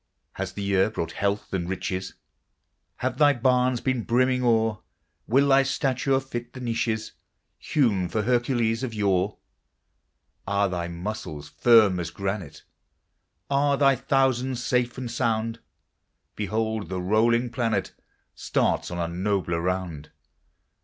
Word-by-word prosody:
Has 95 -1 -4
the 100 - -5
year 100 0 +2
brought 95 -7 -4
health 100 0 -2
and 90 -2 -2
riches? 95 0 -3 0.8
Have - - -3
thy 145 -1 +6
barns 125 0 +2
been 130 -3 0
brimming 125 +3 +2
o'er? 115 -3 +2 0.5
Will 135 +4 +4
thy 135 0 +6
stature 135 0 +1
fit 120 -3 -7
the 130 - -8
niches 115 -2 -2 0.5
Hewn 105 - +1
for 110 - -1
Hercules 120 -1 +1
of 125 -4 -4
yore? 100 -1 +1 1.1
Are 100 0 +2
thy 90 -2 -3
muscles 85 -4 -6
firm 110 -6 +5
as 85 -2 -3
granite? 95 -2 -5 0.8
Are 140 0 +2
thy 135 -1 +4
thousands 130 -1 0
safe 125 -1 0
and 125 -2 -5
sound? 115 -1 -1 0.8
Behold! 110 -1 -2
the 95 0 -3
rolling 115 +6 +2
planet 115 -4 -1 0.4
Starts - - 0
on 90 - -5
a 85 -1 -1
nobler 90 -1 -1
round. 90 -4 -3
110 Hz, 130 wpm, -25 LUFS, 95-125 Hz, 1.1 s, thy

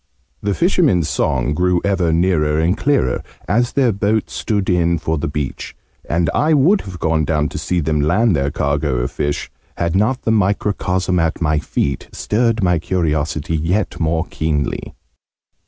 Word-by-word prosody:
The 100 -1 -1
fishermen's 160 - +2
song 75 - 0
grew 90 +2 +2
ever 95 -4 +1
nearer 80 -3 +2
and 85 +4 +2
clearer, 125 - +1 0.3
as 120 +7 +1
their 130 -4 +3
boat 105 +2 0
stood 105 -4 -1
in 85 -1 +2
for 80 0 -2
the - - -2
beach; 75 -2 -4 0.3
and 85 +1 +1
I 155 +1 +3
would 170 +9 +4
have 95 -3 -8
gone 80 -1 +1
down 75 0 0
to - - -5
see 85 +3 -1
them 75 0 0
land 100 +7 +2
their 70 -1 0
cargo 70 -1 -1
of - - -1
fish, 75 -1 -3 0.3
had 85 0 -1
not 115 +7 +1
the 110 - +1
microcosm 100 -3 0
at 80 -1 0
my 75 -2 +1
feet 70 -1 -2
stirred 115 -1 0
my 90 -2 +2
curiosity 80 -2 -1
yet 85 +5 -1
more 80 +1 0
keenly. 75 -2 -2
85 Hz, 165 wpm, -18 LUFS, 75-100 Hz, 0.3 s, would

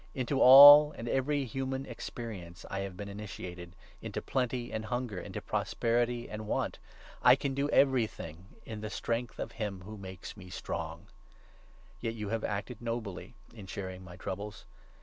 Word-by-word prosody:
Into 135 +1 -1
all 145 +3 +11
and 115 - -6
every 135 +2 0
human 135 +2 -3
experience 105 -7 -7
I 100 - -2
have 95 -2 -5
been 100 0 -6
initiated 90 -4 -8
— - - -26
into - - -4
plenty 125 -2 -2
and 110 0 -3
hunger, 120 -4 -3
into - - -7
prosperity 120 +1 0
and 105 0 -7
want. - - -1 0.4
I 125 0 +8
can 135 0 -2
do 140 +1 0
13 - - +4
everything 110 - 0 0.2
in 110 -2 -7
the 110 - -4
strength 115 +1 -3
of 110 - -4
him 100 -5 -4
who 105 +3 -9
makes 95 -2 -8
me 95 -3 -12
strong 95 - -5
I - - -25 0.9
Yet 115 0 -3
you 105 -2 -5
have 115 0 -2
acted 105 +3 -4
nobly 115 -2 -5 0.2
in 105 -4 -11
sharing 95 -1 -6
my 90 -1 -11
troubles. 100 +4 -6
110 Hz, 170 wpm, -31 LUFS, 100-125 Hz, 0.9 s, all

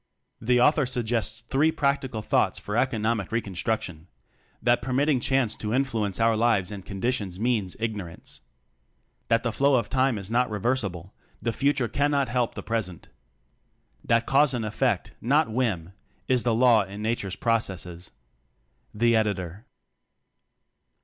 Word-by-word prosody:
The 125 +2 +3
author 145 +2 +4
suggests 115 -3 -1
three 135 +7 +2
practical 135 -7 -1
thoughts - - +1
for 105 - -5
economic 115 -5 0
reconstruc 110 -1 -2
tion: 80 -1 -9 0.5
That 120 +1 +2
permitting 135 +2 +1
chance 125 -3 +1
to 110 +2 -2
influence 115 -8 0
our 115 0 +3
lives 110 -4 +2
and 100 -2 -7
conditions 100 -2 -3
means 110 -5 0
ignorance. 105 -7 -5 0.9
That 115 0 +2
the 120 - 0
flow 140 +4 +3
of 115 -4 0
time 130 -3 +2
is 100 +1 -6
not 125 +1 +2
reversible 105 -5 -2 0.3
the 115 - -2
future 135 -2 +1
cannot 140 +2 +1
help 120 -1 0
the - - -6
present. 105 -7 -4 0.9
That 115 0 +2
cause 135 -1 +3
and 115 -2 -2
effect, 105 - 0
not 140 +1 +2
whim, 105 -8 -1 0.3
is 130 -2 +2
the 115 -1 +1
law 120 -2 +5
in 100 +2 -7
nature's 110 -4 -2
pro 115 -1 +2
cesses. 90 -4 -5 0.9
Editor. 105 -4 0
115 Hz, 140 wpm, -26 LUFS, 105-125 Hz, 0.9 s, law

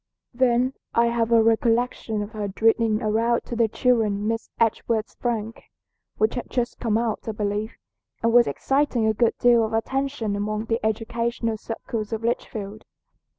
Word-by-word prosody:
"Then 250 +1 +2 0.2
I 235 - +5
have 235 -1 0
a 230 -1 +6
recollection 225 -1 +1
of 205 - -8
her 210 -3 -4
reading 225 0 +3
aloud 230 +2 +1
to 240 - -5
the 230 -1 +3
children 215 -3 +1
Miss 225 0 -2
Edgeworth's 225 -1 0
'Frank,' 225 -2 -3 0.5
which 215 +1 +2
had 245 - -5
just 240 -1 -2
come 220 -3 +1
out, 230 -2 -1
I 220 - -2
believe, 210 +1 -2 0.5
and 230 0 +2
was 240 0 +6
exciting 270 -4 +1
a 220 - +3
good 230 +1 +1
deal 240 -1 +5
of 220 - -3
attention 265 -1 -1
among 210 +2 -2
the 225 0 -1
educational 230 +1 -1
circles 225 -1 -5
of 225 0 -3
Litchfield. 215 -3 -3
225 Hz, 160 wpm, -24 LUFS, 215-235 Hz, 0.5 s, a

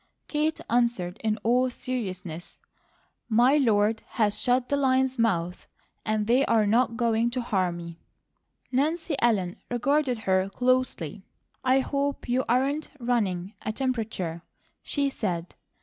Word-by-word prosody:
Kate 305 +1 0
answered 230 -6 0
in 215 -1 +1
all 250 +3 +3
seriousness: 185 -10 -5 0.7
"My 245 +6 +5
Lord 220 -4 +2 0.2
has 210 -3 +2
'shut 250 0 +2
the 285 - +1
lions' 265 -2 +2
mouths,' 180 -6 0 0.4
and 215 -1 0
they 245 +5 +4
are 220 -2 +3
not 230 +2 +2
going 230 -1 +2
to 250 +1 -2
harm 185 -7 0
me." 170 -1 -9 0.7
Nancy 310 +4 0
Ellen 195 -7 +1
regarded 270 +1 +1
her 190 0 +2
closely. 250 - 0 0.4
"I 260 +1 +4
hope 280 +1 -2
you 250 +2 +1
aren't 275 +5 +1
running 205 -6 -1
a 215 - -2
temperature," 220 -9 -2 0.4
she 285 -1 0
said. 175 -8 -3
235 Hz, 130 wpm, -27 LUFS, 200-255 Hz, 0.7 s, My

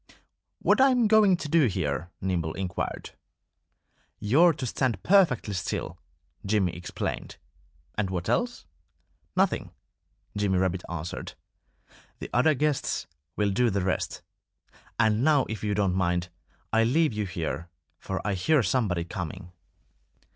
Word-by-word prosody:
"What - - +3
am 255 -3 +5
I - - +4
going 210 -4 +5
to 155 - -5
do 155 -2 +4
here?" 90 -3 -2
Nimble 85 -4 -1
inquired. 95 -2 -4 1.1
"You're 145 +12 +5
to 140 -4 -5
stand 120 -4 -1
perfectly 165 - +3
still," 90 -2 -3 0.4
Jimmy 100 -3 +1
explained. 90 0 -5 0.6
"And 105 -3 -1
what 90 -2 -3
else?" 240 0 -1 0.7
"Nothing!" - - +1 0.7
Jimmy 100 -2 +1
Rabbit 95 0 0
answered. 85 0 -5 0.8
"The - - -8
other 150 +5 +4
guests 150 0 0 0.3
will 105 -1 +1
do 120 +4 +2
the 100 -2 -1
rest.... 95 - -2 0.7
And 110 0 +3
now, 145 -3 +4
if 110 -1 -5
you 105 -1 0
don't 100 -3 +1
mind, 90 -1 0 0.4
I'll 115 0 +4
leave 155 +1 +2
you 105 -1 -2
here; 85 -2 -4 0.3
for 95 - -4
I 105 - +1
hear 135 - +2
somebody 95 -5 0
coming." 90 +1 -6
105 Hz, 135 wpm, -27 LUFS, 90-140 Hz, 1.1 s, am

